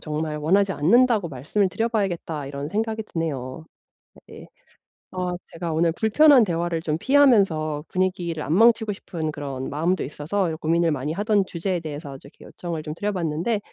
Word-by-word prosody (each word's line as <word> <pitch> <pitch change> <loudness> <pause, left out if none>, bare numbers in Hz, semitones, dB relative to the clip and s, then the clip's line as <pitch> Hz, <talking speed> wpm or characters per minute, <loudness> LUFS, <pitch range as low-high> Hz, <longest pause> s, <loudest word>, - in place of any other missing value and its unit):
정말 155 0 -3
원하지 190 +6 +2
않는다고 215 - +3
말씀을 155 +9 -1
드려봐야겠다.' 195 - -2
이런 140 +1 -5
생각이 220 +3 -2
드네요. 155 -5 -4 0.6
네. - - -12 0.6
아 180 -1 -2 0.2
제가 165 -1 -4
오늘 165 +1 +2
불편한 255 - +5
대화를 170 -3 -2
좀 155 -1 -1
피하면서 195 - +3
분위기를 180 -4 -2
안 155 - -1
망치고 220 +1 +4
싶은 165 -5 -5
그런 140 -3 -5
마음도 165 +6 0
있어서 160 +5 -2
고민을 165 +1 +2
많이 145 0 -2
하던 205 +1 +1
주제에 180 +1 -2
대해서 145 -3 -7
좀 140 - -15
이렇게 - - -17
요청을 170 -3 -6
좀 150 0 -5
드려 205 +6 -2
봤는데 175 +4 -1
170 Hz, 380 characters per minute, -23 LUFS, 155-205 Hz, 0.6 s, 불편한